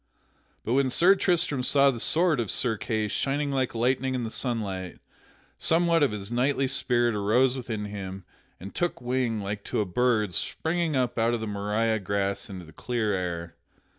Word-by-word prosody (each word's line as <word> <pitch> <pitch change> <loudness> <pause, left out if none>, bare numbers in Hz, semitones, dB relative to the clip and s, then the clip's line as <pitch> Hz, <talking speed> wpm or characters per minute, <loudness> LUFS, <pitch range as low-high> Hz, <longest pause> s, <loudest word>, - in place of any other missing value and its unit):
But 115 - 0
when 135 0 +3
Sir 175 +9 +5
Tristram 175 -8 +1
saw 140 +2 +4
the 120 - -6
sword 165 +2 +2
of 115 -4 -2
Sir 115 -3 0
Kay 110 0 -2
shining 140 +6 -1
like 130 -3 -1
lightning 130 +2 +1
in 125 - -2
the 110 - -4
sunlight, 100 -9 -3 0.6
somewhat 170 0 +3
of 145 - +4
his 105 0 -6
knightly 135 +3 +1
spirit 120 -3 +1
arose 115 +6 +2
within 110 -5 -4
him 95 -2 -7 0.3
and 95 +3 -9
took 175 0 -1
wing 125 -3 -1
like 100 +1 -4
to - - -2
a 105 - +1
bird 110 0 +1
springing 165 - -1
up 125 -2 0
out 115 +1 +2
of - - -3
the 110 - -4
marish 105 +2 -1
grass 100 +2 -2
into 95 -3 -8
the 80 - -15
clear 115 -4 -1
air. 85 -2 -3
120 Hz, 180 wpm, -27 LUFS, 105-135 Hz, 0.6 s, Sir